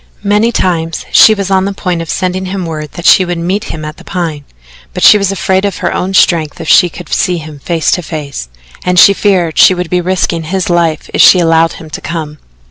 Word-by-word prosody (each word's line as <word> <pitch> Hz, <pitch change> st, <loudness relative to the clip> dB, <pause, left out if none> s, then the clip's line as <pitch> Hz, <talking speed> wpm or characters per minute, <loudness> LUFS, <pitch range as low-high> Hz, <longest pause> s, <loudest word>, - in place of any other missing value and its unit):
Many 210 Hz, +3 st, +1 dB
times 165 Hz, -6 st, -2 dB
she 220 Hz, -, +6 dB
was 195 Hz, -1 st, -4 dB
on 190 Hz, 0 st, +2 dB
the 200 Hz, -, -3 dB
point 180 Hz, -3 st, -3 dB
of 165 Hz, -, -8 dB
sending 185 Hz, 0 st, -2 dB
him 185 Hz, -1 st, -4 dB
word 155 Hz, -2 st, -6 dB
that 170 Hz, -, -8 dB
she 190 Hz, -, +6 dB
would 175 Hz, -1 st, -4 dB
meet 185 Hz, +5 st, -2 dB
him 155 Hz, -1 st, -7 dB
at 155 Hz, +1 st, -8 dB
the -, -, -14 dB
Pine, 160 Hz, -6 st, -5 dB, 0.5 s
but -, -, -3 dB
she -, -, +8 dB
was 200 Hz, -1 st, 0 dB
afraid 190 Hz, 0 st, -1 dB
of 200 Hz, -1 st, -2 dB
her -, -, -2 dB
own 190 Hz, +1 st, -3 dB
strength 165 Hz, -3 st, +1 dB
if 165 Hz, -, -7 dB
she 180 Hz, +2 st, +5 dB
should 175 Hz, -1 st, -10 dB
see 180 Hz, -2 st, 0 dB
him 155 Hz, -2 st, -10 dB
face 165 Hz, +1 st, -1 dB
to 180 Hz, -, 0 dB
face, 150 Hz, -, -7 dB, 0.3 s
and 180 Hz, 0 st, -1 dB
she 200 Hz, +3 st, +7 dB
feared 185 Hz, -6 st, 0 dB
she 185 Hz, -, +6 dB
would 180 Hz, -1 st, -5 dB
be 180 Hz, 0 st, +1 dB
risking 175 Hz, -2 st, -2 dB
his 185 Hz, +2 st, -2 dB
life 170 Hz, -2 st, 0 dB
if -, -, +2 dB
she -, -, +7 dB
allowed 165 Hz, -1 st, +2 dB
him 160 Hz, -1 st, -12 dB
to -, -, -7 dB
come. 155 Hz, -3 st, -6 dB
175 Hz, 235 wpm, -11 LUFS, 160-190 Hz, 0.5 s, she